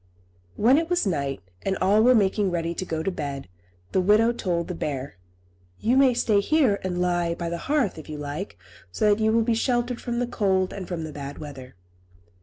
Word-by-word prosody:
When 255 +7 +4
it 330 0 -3
was 355 -6 +1
night, 140 -7 -2 0.2
and 190 - -1
all 200 +3 +3
were 250 +2 +6
making 205 -1 +2
ready 170 -1 -2
to 185 - -4
go 160 -2 -3
to 195 - -1
bed, 140 - -5 0.4
the 190 - +2
widow 210 +5 +4
told 175 -7 -2
the 180 - -4
bear, 140 - -4 0.6
"You 235 +3 +2
may 265 -2 +5
stay 215 -3 +2
here 250 -2 +2
and 180 -1 -2
lie 175 -1 0
by 170 -1 -4
the 170 0 -4
hearth, 275 - +1
if 155 - -12
you 155 - -5
like, 145 - -5 0.3
so 210 - +2
that 210 - -3
you 220 - +3
will 230 0 +3
be 230 +1 +1
sheltered 240 +1 0
from 240 -1 -3
the 245 - +1
cold 190 -5 0
and 190 -3 -6
from 170 -3 -4
the 155 - -6
bad 140 0 -7
weather." 135 -5 -9
190 Hz, 210 wpm, -25 LUFS, 165-230 Hz, 0.6 s, were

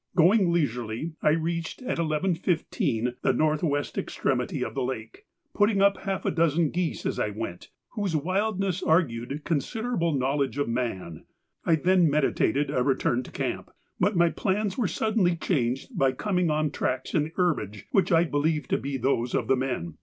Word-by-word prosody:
Going 185 +1 +5
leisurely, 125 -2 -1
I - - +4
reached 165 +6 -2
at 250 - -2
11.15 155 -7 0
the - - +2
north 155 -1 +1
west 145 -3 -1
extremity - - -1
of - - -6
the - - -2
lake, 405 +2 -5 0.3
putting 205 -1 +3
up 200 0 +4
half 195 -1 -3
a - - +2
dozen 165 -1 +2
geese 175 -1 -2
as - - -1
I - - +1
went 100 -4 -6 0.2
whose 200 -7 -2
wildness 190 +3 0
argued 140 -3 0
considerable 170 - -1
knowledge 135 -1 0
of 145 - 0
man. 115 -9 -3 0.4
I 165 - +4
then 175 +1 +3
meditated 145 -1 +1
a 125 - +1
return 125 -2 +1
to - - -11
camp, - - -3 0.3
but 200 +3 +2
my 170 -1 +4
plans 200 +3 -1
were 235 -6 0
suddenly 190 -1 +1
changed 135 -7 -1
by 135 -1 +2
coming 180 +3 0
on 155 -1 +1
tracks 130 -2 -2
in 150 -2 +2
the 160 - -9
herbage 145 - -1
which 195 - +2
I 165 0 +5
believed 150 -2 -1
to - - +2
be 140 0 -3
those 125 -1 0
of - - 0
the 135 - +4
men. 125 - -3
155 Hz, 175 wpm, -26 LUFS, 130-180 Hz, 0.4 s, Going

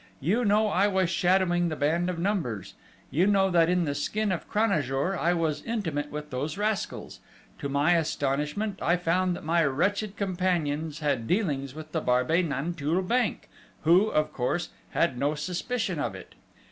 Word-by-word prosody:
You 200 - +1
know 210 0 +3
I 200 0 +3
was 190 -3 +1
shadowing 175 -2 +2
the 155 - -3
band 165 +5 +1
of 180 - -3
Numbers. 165 - -2 0.4
You 175 +6 +3
know 195 -2 +3
that 170 -1 +4
in 180 -1 +2
the 145 - -1
skin 205 +9 -1
of 175 - -4
Cranajour 180 - +1
I 175 0 +1
was 160 -3 -1
intimate 165 -11 -3
with 150 0 -6
those 145 +6 -3
rascals. 210 0 -2 0.4
To 140 - -3
my 140 +4 +2
astonishment 155 +5 -1
I 175 +2 +2
found 180 +1 +1
that - - -9
my 165 +2 +2
wretched 195 +9 0
companions 165 -5 -1
had 135 -6 0
dealings 145 - -1
with 155 0 -9
the 160 - -1
Barbey 125 +7 +2
Nanteuil 160 +2 -1
bank, 240 +4 0 0.4
who, 175 +6 +5
of 155 -6 0
course, 135 +8 -1 0.2
had 135 -7 0
no 145 +3 +1
suspicion 180 +4 -2
of 145 -10 -2
it! 95 - -11
170 Hz, 170 wpm, -27 LUFS, 145-190 Hz, 0.4 s, who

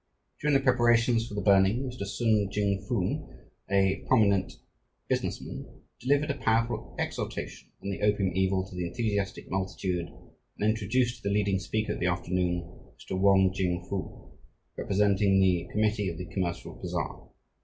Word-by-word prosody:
During 150 -1 +2
the 135 - +3
preparations 120 -2 +3
for 105 - -7
the 100 - -2
burning, 100 +5 +4
Mr. 125 -6 -5
Sun 105 -2 +1
Ching 100 -2 0
Foong, 100 -7 -1 0.4
a 95 0 +2
prominent 100 -3 +3 0.5
business - - -1
man, - - -7 0.3
delivered 145 +3 +2
a 140 - -5
powerful 115 +1 0
exhortation - - -4
on 100 - -2
the 95 - -5
opium 105 -3 +2
evil 95 0 +1
to 95 - -12
the 90 -1 -2
enthusiastic 100 -1 -2
multitude 95 -2 -2 0.5
and 105 - +1
introduced 115 +3 +1
the 100 - -1
leading 100 -1 +1
speaker 110 +3 -2
of - - -6
the 90 - +1
afternoon, 90 0 0 0.3
Mr. - - -6
Wong 95 -1 +4
Ching 90 -2 -1
Foo, 100 -2 -6 0.4
representing 100 -1 +2
the 90 -3 +2
Committee 105 -2 +1
of 85 - -6
the 90 - -5
Commercial 90 -3 -3
Bazaar. - - -4
100 Hz, 155 wpm, -28 LUFS, 95-110 Hz, 0.5 s, burning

